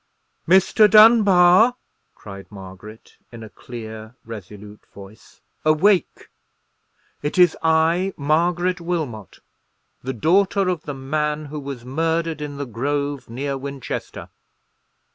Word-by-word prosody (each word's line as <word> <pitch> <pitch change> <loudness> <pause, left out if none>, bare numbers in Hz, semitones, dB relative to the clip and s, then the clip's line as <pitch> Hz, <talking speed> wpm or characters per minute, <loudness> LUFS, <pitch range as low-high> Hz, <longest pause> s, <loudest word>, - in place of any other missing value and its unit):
"Mr. 190 +4 +4
Dunbar!" 215 0 +6 0.4
cried 100 -1 -12
Margaret, 100 +2 -13
in 115 -2 -10
a 110 - -12
clear, 110 -1 -10
resolute 105 -1 -11
voice; 100 +2 -15 0.2
"awake! 170 +5 +1 0.9
it 150 +5 -4
is 180 -2 +5
I, 165 +4 +2
Margaret 175 +4 0
Wilmot, 155 - -5 0.6
the 130 +1 -5
daughter 190 - +1
of 175 -4 -3
the 145 - -5
man 150 +3 -3
who 150 - -4
was 135 -4 -8
murdered 165 +3 -2
in 145 -1 -6
the 140 - -4
grove 140 +3 -3
near 135 +4 -4
Winchester!" 140 -1 -7
150 Hz, 110 wpm, -21 LUFS, 115-175 Hz, 0.9 s, Dunbar